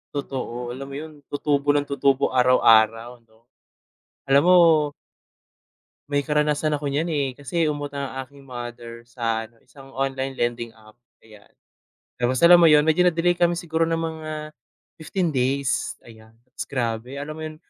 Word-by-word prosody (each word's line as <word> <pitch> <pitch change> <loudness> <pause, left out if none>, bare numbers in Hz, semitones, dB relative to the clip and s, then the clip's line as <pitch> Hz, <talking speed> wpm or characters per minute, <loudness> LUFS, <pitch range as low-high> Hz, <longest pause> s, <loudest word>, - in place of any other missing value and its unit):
Totoo 125 -3 -4
alam 135 +2 -7
mo 135 - -8
'yon 155 +2 -7 0.2
tutubo 145 -1 -1
ng 145 - +2
tutubo 140 -1 +2
ara-araw 115 -2 +4 0.2
'no. 110 0 -27 0.9
Alam 140 +1 +5
mo 180 - +7 1.6
May 145 0 0
karanasan 150 +1 0
ako 145 -1 -2
niyan, 150 +5 -1
eh, 145 -3 0
kasi 160 +3 -1
umutang 145 -2 -4
ang 135 0 -6
aking 140 +2 -18
mother 120 -1 -8
sa 115 -2 -3
ano, 115 +1 -16
isang 135 +3 -17
online 135 0 -3
lending 120 -1 -2
app 110 -1 -20 0.2
ayan, 105 -2 -19 0.7
tapos 125 +1 +1
alam 175 - +9
mo 165 - +7
yun 150 0 +5
medyo 160 +3 +3
na-delay 175 0 +2
kami 175 -1 +1
siguro 165 -1 -2
ng 165 0 +1
mga 155 -1 -5 0.5
15 170 +1 -2
days 130 -1 -1
ayan, 110 -1 -16 0.4
grabe 120 0 -3
alam 150 +2 -6
mo 160 - -8
yun, 155 0 -7
140 Hz, 155 wpm, -23 LUFS, 120-155 Hz, 1.6 s, alam